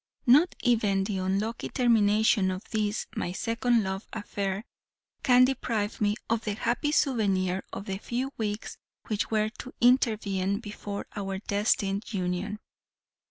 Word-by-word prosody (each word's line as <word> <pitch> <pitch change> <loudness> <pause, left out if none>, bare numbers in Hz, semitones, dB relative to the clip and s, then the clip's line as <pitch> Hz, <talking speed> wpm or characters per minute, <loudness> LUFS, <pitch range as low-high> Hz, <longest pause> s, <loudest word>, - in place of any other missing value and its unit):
Not 295 +8 +5
even 210 -6 +2
the 195 -1 -2
unlucky 195 +5 -1
termination 220 -4 +3
of 185 +1 -4
this 215 -1 -1
my 175 - -2
second 230 +2 +1
love 190 +1 -4
affair 200 -1 -3 0.6
can 250 0 +6
deprive 230 -6 -2
me 205 0 +2
of 230 0 0
the 210 -1 -2
happy 240 +7 0
souvenir 195 -10 +1
of 200 - -6
the 195 -1 -4
few 250 +5 -3
weeks 210 -1 -4 0.3
which 215 -1 -1
were 215 -1 +1
to 255 - -8
intervene 210 -6 +2
before 205 -2 -6
our 195 -2 -3
destined 200 0 0
union. 185 +2 -2
210 Hz, 135 wpm, -28 LUFS, 195-230 Hz, 0.6 s, can